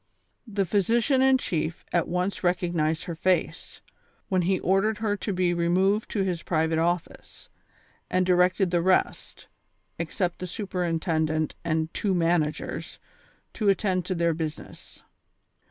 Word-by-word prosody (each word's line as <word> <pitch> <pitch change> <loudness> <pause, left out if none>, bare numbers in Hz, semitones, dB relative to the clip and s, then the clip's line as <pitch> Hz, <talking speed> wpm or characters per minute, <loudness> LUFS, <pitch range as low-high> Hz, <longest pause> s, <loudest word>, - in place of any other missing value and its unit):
Tlie 200 -1 0
physician 230 - +2
in 265 0 +5
chief 165 -7 -3
at 175 - +2
once 180 +3 -2
recognized 175 -3 0
her 170 - -5
face, 180 +3 -1 0.5
when 185 -1 +2
he 185 +2 +1
ordered 195 +4 +2
her 210 -1 0
to 205 - -3
be 180 -2 +1
removed 185 +5 +1
to 200 - 0
his 180 -3 -2
private 160 -1 0
office, 170 +1 -3 0.6
and 185 0 +1
di 180 - +3
rected 180 +1 +2
tlie 175 -1 +1
rest, 185 +1 0 0.5
except 180 -6 -2
the 185 - -4
superintendent 165 -5 -1
and 160 -1 -1
two 195 -3 0
man 170 -1 +3
agers, 150 0 -5 0.6
to 210 -3 +1
attend 190 -1 +1
to 185 - -2
their 170 -1 +1
business. 155 -1 -7
180 Hz, 140 wpm, -26 LUFS, 165-195 Hz, 0.6 s, in